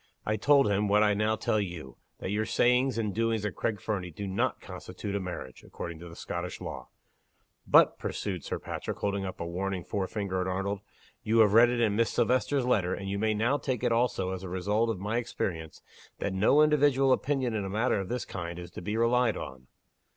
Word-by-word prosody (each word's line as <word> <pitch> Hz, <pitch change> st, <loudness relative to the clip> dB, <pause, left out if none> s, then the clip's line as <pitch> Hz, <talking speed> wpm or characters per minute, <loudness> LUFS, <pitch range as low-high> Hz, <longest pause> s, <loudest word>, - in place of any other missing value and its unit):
I 110 Hz, -, +1 dB
told 140 Hz, +4 st, +4 dB
him, 105 Hz, +1 st, +1 dB
what 105 Hz, +1 st, +4 dB
I 105 Hz, -1 st, +4 dB
now 105 Hz, +2 st, +1 dB
tell 110 Hz, 0 st, 0 dB
you 85 Hz, -10 st, -5 dB, 0.2 s
that 95 Hz, -, -4 dB
your 110 Hz, +1 st, 0 dB
sayings 125 Hz, 0 st, +3 dB
and 105 Hz, -3 st, -1 dB
doings 115 Hz, -1 st, 0 dB
at 105 Hz, -, -2 dB
Craig 105 Hz, -3 st, -2 dB
Fernie, 95 Hz, -2 st, -3 dB
do 100 Hz, +5 st, -6 dB
not 95 Hz, 0 st, -1 dB
constitute 100 Hz, -, -7 dB
a -, -, 0 dB
marriage, 90 Hz, -8 st, -7 dB
according 85 Hz, -2 st, -7 dB
to 85 Hz, -1 st, -10 dB
Scottish 85 Hz, +1 st, -5 dB
law. -, -, -7 dB, 0.8 s
But," -, -, +5 dB
pursued 90 Hz, -6 st, -3 dB
Sir -, -, -3 dB
Patrick, -, -, -5 dB
holding 100 Hz, -1 st, -1 dB
up 95 Hz, -, -6 dB
a -, -, -3 dB
warning 90 Hz, +1 st, -3 dB
forefinger 95 Hz, -1 st, -2 dB
at 90 Hz, -, -2 dB
Arnold, 95 Hz, +2 st, -2 dB, 0.4 s
"you 110 Hz, +2 st, +1 dB
have 105 Hz, -2 st, +5 dB
read 120 Hz, +2 st, +7 dB
it 120 Hz, 0 st, -1 dB
in 105 Hz, -3 st, +2 dB
Miss 115 Hz, +1 st, +2 dB
Silvester's 130 Hz, +1 st, +1 dB
letter, 95 Hz, -7 st, +1 dB
and 95 Hz, 0 st, -6 dB
you 100 Hz, -, -2 dB
may 110 Hz, 0 st, +1 dB
now 120 Hz, +7 st, +1 dB
take 130 Hz, -3 st, -2 dB
it 120 Hz, -, +2 dB
also 115 Hz, -6 st, +1 dB
as 95 Hz, -1 st, -4 dB
a 95 Hz, -, -6 dB
result 105 Hz, +5 st, 0 dB
of 110 Hz, -, -1 dB
my 105 Hz, +5 st, -2 dB
experience, 85 Hz, -9 st, -4 dB, 0.3 s
that 100 Hz, -, -2 dB
no 110 Hz, +10 st, +5 dB
individual 145 Hz, -3 st, +4 dB
opinion, 130 Hz, -3 st, +1 dB
in 105 Hz, -2 st, -1 dB
a 95 Hz, -, -4 dB
matter 110 Hz, +2 st, +1 dB
of 95 Hz, -, -5 dB
this 125 Hz, 0 st, -2 dB
kind, 85 Hz, -2 st, -6 dB
is 90 Hz, 0 st, -8 dB
to -, -, -8 dB
be 105 Hz, +4 st, -2 dB
relied 115 Hz, 0 st, +3 dB
on. 65 Hz, -3 st, -8 dB
105 Hz, 215 wpm, -29 LUFS, 95-115 Hz, 0.8 s, read